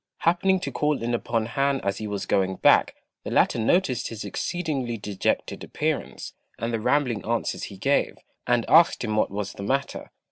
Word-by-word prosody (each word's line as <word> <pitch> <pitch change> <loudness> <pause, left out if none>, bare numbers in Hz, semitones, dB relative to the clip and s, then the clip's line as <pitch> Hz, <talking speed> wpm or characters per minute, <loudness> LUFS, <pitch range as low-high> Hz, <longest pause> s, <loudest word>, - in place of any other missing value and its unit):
Happening 180 +3 +3
to - - -3
call 150 -4 0
in 120 +1 -1
upon 115 -1 -1
Han 135 +4 0
as 100 0 -2
he 110 - -4
was 100 -1 -3
going 95 -1 +1
back, - - +4 0.3
the - - -5
latter - - +2
noticed 125 0 +1
his 110 -2 -7
exceedingly 135 - -3
dejected 100 -2 -2
appearance, - - -3 0.2
and 115 +1 -3
the 115 - 0
rambling 120 -3 +1
answers 115 +1 -2
he 100 - -10
gave, 140 +8 +1 0.3
and 120 -2 +2
asked 165 -3 +5
him 110 -2 -1
what 110 - +2
was 100 0 -4
the - - -9
matter. 135 +7 -2
120 Hz, 180 wpm, -25 LUFS, 105-140 Hz, 0.3 s, asked